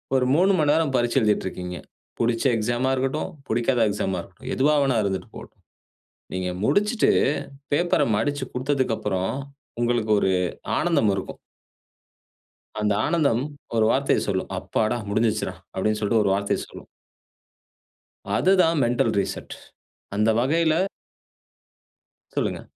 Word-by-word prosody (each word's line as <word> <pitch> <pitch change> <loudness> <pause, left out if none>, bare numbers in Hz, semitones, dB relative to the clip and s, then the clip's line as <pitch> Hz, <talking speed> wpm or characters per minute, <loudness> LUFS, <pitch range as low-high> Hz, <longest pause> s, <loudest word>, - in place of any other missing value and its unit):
ஒரு 125 -1 +2
3 190 +4 +4
மணி 145 -1 +3
நேரம் 155 -4 +1
பரீட்சை 120 +2 +2
எழுதிட்டு 105 -3 +1
இருக்கீங்க. 90 -1 -6 0.4
புடுச்ச 115 +3 0
எக்ஸாம்மா 120 +4 0
இருக்கட்டும், 135 +6 -1 0.2
புடிக்காத 120 +1 +2
எக்ஸாம்மா 95 -2 -2
இருக்கட்டும். - - -10
எதுவா 145 +3 +3
வேணா 130 -4 +1
இருந்துட்டு 95 -1 -3
போகட்டும். - - -11 0.8
நீங்க 95 0 -2 0.2
முடிச்சுட்டு, 210 - +2 0.6
பேப்பர்ர 175 +4 +2
மடிச்சு 145 +2 -1
குடுத்ததுக்கு 130 -2 0
அப்புறம் 95 -2 -1 0.5
உங்களுக்கு 120 -2 0
ஒரு 95 - +2 0.4
ஆனந்தம் 160 -12 +2
இருக்கும். 95 - -5 1.4
அந்த 105 -1 +1
ஆனந்தம் 140 -8 +2 0.3
ஒரு 110 -1 +3
வார்த்தைய 135 +1 +2
சொல்லும். 95 -1 -2
அப்பாடா! 110 +2 -1
முடிஞ்சிருச்சிருடா. 110 +1 0 0.2
அப்டினு 105 +3 0
சொல்ட்டு 110 +1 +2
ஒரு 100 - +2
வார்த்தைய 100 +1 0
சொல்லும் - - -12 1.5
அதுதான் 180 -4 +3
மெண்டல் 120 -1 +1
ரீசெட். 95 - -4 0.6
அந்த 105 +2 +2
வகையில 160 +5 +2 1.6
சொல்லுங்க. - - -1
120 Hz, 120 wpm, -24 LUFS, 105-145 Hz, 1.6 s, 3